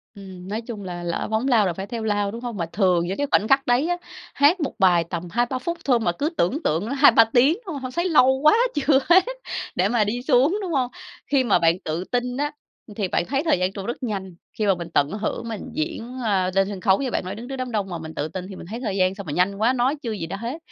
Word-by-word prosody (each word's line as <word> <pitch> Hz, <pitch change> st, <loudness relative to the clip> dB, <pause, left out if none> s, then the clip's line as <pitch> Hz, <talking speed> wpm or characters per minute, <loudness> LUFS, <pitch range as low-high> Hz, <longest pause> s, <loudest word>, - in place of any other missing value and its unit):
Ừm, 190 Hz, -2 st, -10 dB
nói 215 Hz, +3 st, -3 dB
chung 225 Hz, -4 st, -7 dB
là 175 Hz, -1 st, -6 dB
lỡ 170 Hz, -1 st, -2 dB
phóng 220 Hz, +4 st, 0 dB
lao 225 Hz, -6 st, +4 dB
là 175 Hz, -, 0 dB
phải 195 Hz, +3 st, -6 dB
theo 230 Hz, 0 st, -5 dB
lao, 205 Hz, -2 st, 0 dB
đúng 230 Hz, +2 st, -7 dB
hông? 240 Hz, -4 st, -5 dB
Mà 170 Hz, -, -1 dB
thường 175 Hz, -1 st, +1 dB
những 190 Hz, -, -3 dB
cái 285 Hz, -, -1 dB
khoảnh 215 Hz, -, +3 dB
khắc 270 Hz, +1 st, +3 dB
đấy 250 Hz, +6 st, +3 dB
á, 350 Hz, -, 0 dB, 0.4 s
hát 295 Hz, +6 st, +4 dB
1 290 Hz, -, -2 dB
bài 175 Hz, -3 st, +4 dB
tầm 175 Hz, 0 st, -4 dB
2-3 240 Hz, +3 st, 0 dB
phút 340 Hz, +4 st, -3 dB
thôi 250 Hz, -4 st, +3 dB
mà 175 Hz, -, +1 dB
cứ 285 Hz, -, -2 dB
tưởng 265 Hz, -, 0 dB
tượng 165 Hz, +8 st, 0 dB
là 275 Hz, -, -2 dB
2-3 235 Hz, -5 st, +7 dB
tiếng, 265 Hz, +6 st, +5 dB
đúng 345 Hz, -, -5 dB
không? 275 Hz, -, -6 dB
Hông 255 Hz, -1 st, -5 dB
thấy 345 Hz, +6 st, -1 dB
lâu 265 Hz, -4 st, +5 dB
quá 305 Hz, -, +7 dB, 0.2 s
chưa 280 Hz, -1 st, +3 dB
hết 370 Hz, +2 st, +7 dB, 0.5 s
để 185 Hz, +3 st, +2 dB
mà 225 Hz, -2 st, +2 dB
đi 235 Hz, +4 st, -2 dB
xuống, 280 Hz, +8 st, +3 dB
đúng 370 Hz, -4 st, -4 dB
hông? 255 Hz, -4 st, 0 dB, 0.4 s
Khi 275 Hz, -3 st, +2 dB
mà 225 Hz, -, +3 dB
bạn 165 Hz, +2 st, +3 dB
tự 160 Hz, +3 st, -2 dB
tin 245 Hz, +4 st, -2 dB
á, 290 Hz, +1 st, -1 dB, 0.4 s
ừm, 210 Hz, -, -12 dB
thì 200 Hz, -4 st, -1 dB
bạn 175 Hz, -, 0 dB
thấy 275 Hz, -, -1 dB
thời 315 Hz, -, +2 dB
gian 185 Hz, +1 st, 0 dB
trôi 195 Hz, +2 st, -6 dB
rất 240 Hz, -, -5 dB
nhanh, 190 Hz, -6 st, -4 dB, 0.2 s
khi 215 Hz, -, 0 dB
mà 195 Hz, -, +3 dB
mình 170 Hz, -1 st, -7 dB
tận 145 Hz, 0 st, +3 dB
hưởng 220 Hz, +2 st, -3 dB
mình 215 Hz, -3 st, -5 dB
diễn, 290 Hz, -6 st, -4 dB
a, 190 Hz, -4 st, +1 dB
lên 195 Hz, 0 st, +3 dB
sân 195 Hz, -2 st, -6 dB
khấu 195 Hz, +5 st, +3 dB
như 260 Hz, -, -2 dB
bạn -, -, -1 dB
nói, 190 Hz, +2 st, -5 dB
đứng 235 Hz, +3 st, -8 dB
trước 270 Hz, -, -4 dB
đám 255 Hz, -1 st, -4 dB
đông 205 Hz, -3 st, -2 dB
mà 175 Hz, -, -4 dB
mình 160 Hz, 0 st, -8 dB
tự 150 Hz, -, -2 dB
tin 185 Hz, +3 st, -6 dB
thì 190 Hz, -, -8 dB
mình -, -, -10 dB
thấy 230 Hz, +3 st, -5 dB
thời 205 Hz, -6 st, -3 dB
gian 185 Hz, +1 st, +2 dB
sao 200 Hz, -, -7 dB
mà 150 Hz, -, -6 dB
nhanh 185 Hz, +5 st, +1 dB
quá, 225 Hz, +5 st, +2 dB
nói 260 Hz, +4 st, +1 dB
chưa 230 Hz, -, -4 dB
gì 195 Hz, -6 st, -4 dB
đã 195 Hz, -, -5 dB
hết. 240 Hz, +8 st, -5 dB
220 Hz, 290 wpm, -23 LUFS, 190-260 Hz, 0.5 s, 2-3